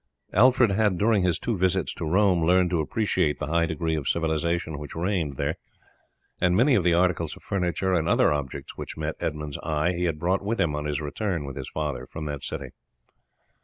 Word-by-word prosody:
Alfred 125 -2 +5
had, 100 -2 +2
during 105 +1 +3
his 90 -3 +2
two 115 - -2
visits 95 -1 +1
to 80 - -4
Rome, 95 -1 +3
learned 90 +1 +3
to 85 -3 +2
appreciate 80 -3 0
the - - -3
high 85 +3 +1
degree 80 0 -1
of 75 -3 -3
civilization 80 -1 -1
which 75 - -8
reigned 85 -4 -1
there, - - -2 0.8
and 90 0 +3
many 130 +5 +4
of 100 -7 +3
the 85 -1 +3
articles 85 -3 +1
of - - -16
furniture 95 0 -1
and 80 -3 +1
other - - +4
objects 70 -3 -5
which - - -7
met - - -2
Edmund's 75 -1 -4
eye 80 +3 0
he 90 0 -1
had 80 -3 -1
brought 90 +5 0
with 110 +4 -2
him 75 -3 +1
on 75 0 -3
his 75 0 -1
return 80 +1 -2
with 70 -2 -7
his 65 -2 -6
father 70 -5 -3
from 80 - -7
that 75 -2 -5
city. - - -4
85 Hz, 205 wpm, -26 LUFS, 75-95 Hz, 0.8 s, Alfred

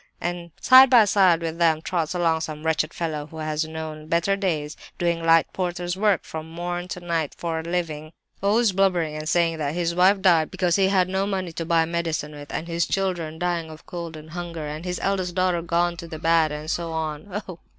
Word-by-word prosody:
And 175 -1 -4
side 260 0 +8
by 240 -4 +7
side 185 -4 +4
with 165 0 -4
them 165 -2 +3
trots 165 0 -2
along 165 -2 +1
some 155 -1 -6
wretched 160 0 +1
fellow 155 -3 -4
who 160 - -12
has 155 0 -2
known 155 -1 -7
better 170 +4 +1
days, 160 -7 -2 0.2
doing 170 -1 0
light 165 0 +4
porter's 175 -1 -2
work 205 -2 +2
from 160 0 -7
morn 175 +1 -4
to 180 - -5
night 165 -4 -2
for 165 -2 -2
a - - -5
living, 160 -3 -3 0.3
always 210 +2 +3
blubbering 180 -5 +1
and 155 0 -4
saying 165 -1 +2
that 145 0 -2
'his 170 -1 0
wife 185 +3 +4
died 170 -5 +4
because 180 -2 0
he 195 -1 +3
had 190 -2 +3
no 190 +1 -1
money 190 -3 -2
to 165 0 -5
buy 165 0 +3
medicine 165 -2 -2
with,' 145 -1 -10
and 165 - -4
his 170 0 0
children 175 -5 -2
dying 170 -2 -2
of 155 0 -12
cold 170 -2 -6
and 155 0 -12
hunger, 170 -2 -5
and 150 +3 -6
his 180 -1 -3
eldest 185 -3 -1
daughter 185 -2 +1
gone 170 +1 0
to 170 - -8
the 160 -1 -7
bad, 160 -1 +3
and 150 +2 -4
so 170 -2 -2
on. 160 +6 -4
Oh! 180 -3 -8
170 Hz, 215 wpm, -24 LUFS, 160-180 Hz, 0.3 s, side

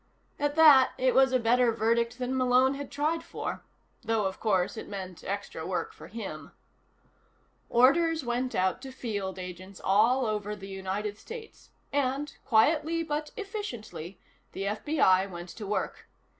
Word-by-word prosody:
At 290 0 0
that, 295 -5 +7
it 255 0 +2
was 265 0 +5
a 255 - +4
better 240 0 +3
verdict 230 +1 +1
than 255 +1 -2
Malone 255 +1 +4
had 280 0 -6
tried 310 +3 0
for. - - -5 0.4
Though, 225 -2 +1
of 190 0 -3
course, 195 -4 +1
it - - -7
meant 185 -3 -7
extra 200 0 -4
work 445 - -3
for 440 - -12
him. 200 -8 -7 1.2
Orders 315 +6 +4
went 245 +1 -1
out 185 0 +1
to 270 - -8
field 205 -7 -4
agents 185 +1 -8
all 230 +7 +4
over 210 -1 -2
the 195 -1 -10
United 195 +2 -4
States, 455 -1 -10 0.2
and, 280 +1 -1
quietly 310 +7 +3
but 300 -1 -3
efficiently, 245 - -6 0.4
the 195 - -4
FBI 200 -3 +2
went 175 -1 -8
to 200 +4 -8
work. 210 - -3
235 Hz, 150 wpm, -29 LUFS, 200-280 Hz, 1.2 s, that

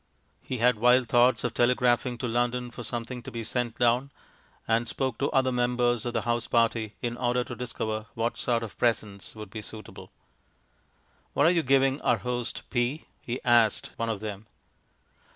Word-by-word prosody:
He 130 - -4
had 120 -1 +3
wild 125 +1 +5
thoughts 120 0 +4
of 125 -2 -1
telegraphing 125 0 +2
to 120 - -3
London 120 +1 -1
for 120 - -8
something 120 +2 -4
to - - -8
be 115 -1 -5
sent 120 +1 -2
down, 125 +3 +2 0.6
and 115 +1 +1
spoke 130 -3 -2
to 140 - +1
other 130 -1 +2
members 120 -1 +1
of 120 - -3
the 115 - -1
house 120 +1 -1
party 115 -2 +1
in 120 -1 -1
order 125 0 +1
to - - -7
discover 110 -3 -4
what 115 +1 -1
sort 120 -2 0
of 110 - -8
presents 105 -5 -1
would 105 -2 -9
be 110 - -6
suitable. 110 0 -10 1.2
"What 145 - +3
are 165 - +6
you 175 -2 +2
giving 135 0 +3
our 120 - +3
host 120 +3 -3
P" 125 +5 0 0.2
he 125 +2 -4
asked 120 -3 +3
one 115 0 -2
of 110 -3 -3
them. 105 0 -6
120 Hz, 180 wpm, -27 LUFS, 115-125 Hz, 1.2 s, are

